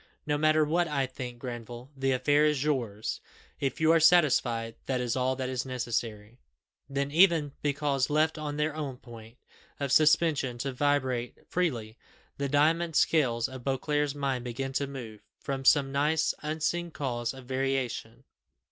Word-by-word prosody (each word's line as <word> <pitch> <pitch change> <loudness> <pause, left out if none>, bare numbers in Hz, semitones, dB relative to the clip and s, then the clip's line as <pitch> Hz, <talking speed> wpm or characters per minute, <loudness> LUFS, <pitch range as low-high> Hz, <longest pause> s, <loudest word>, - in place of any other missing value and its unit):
"No 150 - 0
matter 155 +1 +3
what 170 +3 +1
I 140 -3 0
think, 125 -1 -7
Granville, 120 +1 -8
the 135 0 0
affair 145 +3 +3
is 150 -3 +2
yours. 120 -8 -2 0.4
If 135 -2 -2
you 160 0 +4
are 165 - +5
satisfied, 130 -9 +3
that 130 -2 0
is 120 -2 -1
all 130 0 +1
that 130 0 -3
is 130 -1 -2
necessary." 115 -3 -4 0.5
Then 140 0 -2
even, 165 -3 +4
because 140 -2 0
left 155 +1 +1
on 150 -1 -4
their 150 0 0
own 140 -5 -4
point 115 -1 -13 0.4
of 140 -2 -2
suspension 150 -5 +3
to 135 +2 -3
vibrate 130 -3 0
freely, 120 -11 -2 0.4
the 140 -1 -1
diamond 160 +3 +2
scales 125 -8 +2
of 130 -1 -9
Beauclerc's 145 +2 -1
mind 135 -3 -2
began 135 +2 -4
to 140 +1 -1
move, 120 -6 -8 0.2
from 135 -1 -4
some 135 0 +5
nice, 150 +3 +1
unseen 160 +3 -2
cause 120 -6 -3
of 130 -1 -11
variation. 135 -1 -2
135 Hz, 155 wpm, -29 LUFS, 125-150 Hz, 0.5 s, are